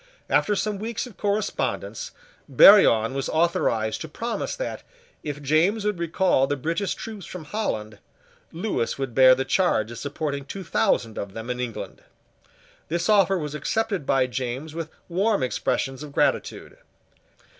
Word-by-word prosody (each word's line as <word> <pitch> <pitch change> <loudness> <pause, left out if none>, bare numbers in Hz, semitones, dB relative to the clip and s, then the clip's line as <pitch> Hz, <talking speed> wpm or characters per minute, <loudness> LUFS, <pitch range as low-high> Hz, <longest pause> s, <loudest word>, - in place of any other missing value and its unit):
After 210 - +3
some 210 0 -2
weeks 225 +3 -3
of 245 -6 -12
correspondence, 205 +1 -2 0.4
Barillon 125 - +7
was 135 0 -2
authorised 135 -9 +1
to 160 - -5
promise 230 +9 -3
that, - - -5 0.4
if 145 -1 -6
James 170 +9 +2
would 210 -4 -1
recall 170 -4 +2
the 145 - 0
British 165 +8 -2
troops 215 -4 -8
from 180 -3 -8
Holland, 110 - -3 0.5
Lewis 170 - -2
would 135 -3 -4
bear 130 +1 +7
the 130 +1 -2
charge 130 - +1
of 120 - -7
supporting 140 0 -3
two 195 +6 -7
thousand 145 - 0
of 100 -1 -6
them 115 +2 -5
in 125 - -4
England. 120 -3 -5 0.9
This 170 +3 -1
offer 195 -2 +4
was 150 -3 -4
accepted 195 +2 -2
by 135 -1 +3
James 130 +4 -4
with 165 -1 -5 0.2
warm 195 +3 +1
expressions 135 +1 -1
of 150 -2 -9
gratitude. - - -1
155 Hz, 150 wpm, -24 LUFS, 130-200 Hz, 0.9 s, Barillon